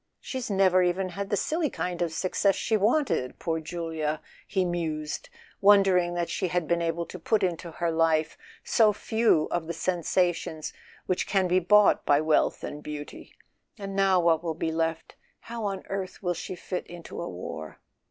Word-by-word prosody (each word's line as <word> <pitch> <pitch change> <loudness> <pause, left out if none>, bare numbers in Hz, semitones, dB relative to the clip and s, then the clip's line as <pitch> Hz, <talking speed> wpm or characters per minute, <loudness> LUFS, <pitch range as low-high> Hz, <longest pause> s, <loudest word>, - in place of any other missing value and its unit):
"She's 260 -3 -5
never 190 -2 +4
even 180 +1 +1
had 195 +2 -5
the 205 - +1
silly 315 - 0
kind 180 -5 -3
of 170 -2 0
success 190 +3 +1
she 220 - 0
wanted—poor 200 - +1
Julia! 160 -2 -3 0.2
" - - -25
he 185 - +4
mused, 165 - -3 0.3
wondering 195 -3 +5
that 175 -1 -1
she 185 - -1
had 175 -2 -1
been 170 0 +1
able 170 0 -1
to 185 - -9
put 215 +5 +1
into 175 -1 -1
her 170 0 -1
life 160 -1 +2 0.3
so 215 -2 +4
few 220 -6 +2
of 170 -2 -1
the 170 - -3
sen¬ 175 +2 -1
sations 170 -2 0 0.3
which 185 - -1
can 190 -2 +2
be 180 +1 +3
bought 210 +3 +5
by 145 0 +4
wealth 155 0 +2
and 150 - -6
beauty. 150 -1 -8 0.4
"And 195 -2 -6
now 195 -2 +4
what 165 -1 +3
will 165 -2 -2
be 160 0 -2
left—how 165 +7 -4
on 195 -1 -3
earth 195 0 -5
will 180 -1 +1
she 180 - -6
fit 180 +1 -5
into 170 -1 -8
a - - -4
war 80 -4 -7
175 Hz, 180 wpm, -27 LUFS, 160-195 Hz, 0.4 s, wondering